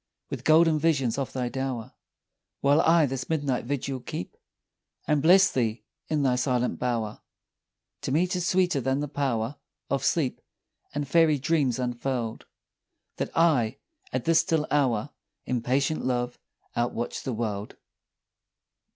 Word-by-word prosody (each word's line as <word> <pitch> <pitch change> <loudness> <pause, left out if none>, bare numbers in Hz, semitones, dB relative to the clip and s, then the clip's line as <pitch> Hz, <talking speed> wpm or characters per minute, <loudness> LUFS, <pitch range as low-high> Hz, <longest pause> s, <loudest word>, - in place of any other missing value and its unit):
With - - -5
golden 160 0 +5
visions 140 -6 +1
of 135 - -3
thy 125 -2 -2
dower, 130 -3 -4 0.7
While 145 +3 +4
I 165 -1 +5
this 135 -1 -4
midnight 145 -7 0
vigil 135 0 -2
keep, 90 -6 -6 0.7
And 150 -2 +2
bless 185 +5 +6
thee 115 -3 -1 0.2
in 150 -2 0
thy 125 -2 +2
silent 125 -1 0
bower; 115 -4 -2 0.8
To - - -3
me 160 +6 +3
'tis 180 -1 -2
sweeter 180 -7 +2
than 135 +3 0
the 150 - -2
power 135 -3 -1 0.3
Of 140 - 0
sleep, 145 -7 0 0.5
and 145 -1 -2
fairy 160 0 +4
dreams 140 -4 +1
unfurl'd, 125 -2 -3 0.7
That - - -2
I 165 - +6 0.2
alone, 110 +2 -3 0.4
at 130 -1 -2
this 165 -1 +5
still 160 -2 +1
hour, 135 -3 +1 0.3
In 125 -2 -1
patient 135 +6 0
love 125 -1 -1 0.4
outwatch 120 0 -2
the 130 - -3
world. 105 -2 -3
135 Hz, 140 wpm, -27 LUFS, 120-150 Hz, 0.8 s, bless